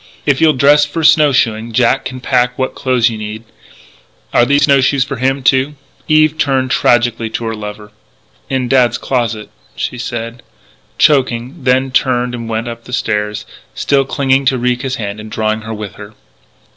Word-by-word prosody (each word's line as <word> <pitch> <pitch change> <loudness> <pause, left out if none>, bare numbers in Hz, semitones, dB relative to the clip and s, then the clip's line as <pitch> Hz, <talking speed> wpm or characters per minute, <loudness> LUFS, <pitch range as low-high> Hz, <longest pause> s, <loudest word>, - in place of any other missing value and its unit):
If 140 -3 +1
you'll 160 -1 +5
dress 145 +2 +4
for 155 +3 -3
snow 150 -1 +5
shoeing, 115 -2 0
Jack 125 +3 +2
can 130 0 -6
pack 125 0 +1
what 130 0 -2
clothes 125 -2 +1
you 110 - -6
need.... 105 +1 -6 0.9
Are 120 - +4
there 140 - +3
snow 140 -1 +4
shoes 135 0 +2
for 140 0 -6
him, 135 +2 0
too?" 135 +3 +2 0.3
Eve 155 0 +3
turned 130 -3 0
tragically 120 -2 +2
to 115 +1 -4
her 115 - -2
lover: 105 -1 -8 0.6
"In 130 -2 -1
Dad's 125 -1 +3
closet 115 -4 -2
" - - -33
she 125 - -4
said, 120 0 -5 0.6
choking; 130 0 +1
then 130 +1 +2
turned 125 -1 +1
and 115 -2 -6
went 115 +1 -2
up 115 0 -8
the 125 - -10
stairs, 105 -3 -2 0.3
still 140 -1 +1
clinging 135 0 +1
to 130 0 +2
Ricca's 125 +1 -1
hand 105 -2 -5
and 110 0 -9
drawing 110 0 -1
her 110 +1 -6
with 105 -2 -7
her. 105 +1 -11
125 Hz, 180 wpm, -15 LUFS, 115-135 Hz, 0.9 s, you'll